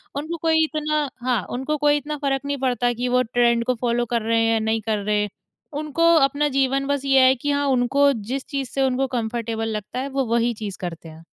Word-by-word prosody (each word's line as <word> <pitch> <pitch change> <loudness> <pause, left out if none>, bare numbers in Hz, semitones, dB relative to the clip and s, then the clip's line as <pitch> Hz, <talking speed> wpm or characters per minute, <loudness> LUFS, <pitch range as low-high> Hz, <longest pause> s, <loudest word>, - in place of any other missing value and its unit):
उनको 315 +4 -4
कोई 320 -1 +3
इतना 305 -1 -1 0.2
हाँ, 245 -4 +1
उनको 265 +5 -2
कोई 295 0 +3
इतना 295 +1 -5
फ़र्क 270 -1 +1
नहीं 285 0 -2
पड़ता 250 -2 0
कि 245 +2 -3
वो 250 0 +3
ट्रेंड 235 0 +2
को 255 - +1
फॉलो 240 0 +1
कर 235 0 -1
रहे 230 +1 +1
हैं 225 - +2
या 225 - +2
नहीं 220 0 0
कर 220 0 -1
रहे 210 +1 0
हैं। 210 - -2 0.5
उनको 335 +3 +2
अपना 285 0 +3
जीवन 275 0 +1
बस 285 -1 -1
ये 270 -1 +4
है 260 - +4
कि 290 +3 -2
हाँ 285 0 0
उनको 275 +2 +3
जिस 250 +4 -5
चीज़ 275 -4 -3
से 270 - -2
उनको 265 0 +1
कम्फर्टेबल 230 -2 -3
लगता 210 +5 -6
है, 275 +2 -3
वो 270 -1 -1
वही 235 +1 +1
चीज़ 210 -3 -6
करते 165 -2 -6
हैं। 160 +1 -13
255 Hz, 230 wpm, -22 LUFS, 230-285 Hz, 0.5 s, ये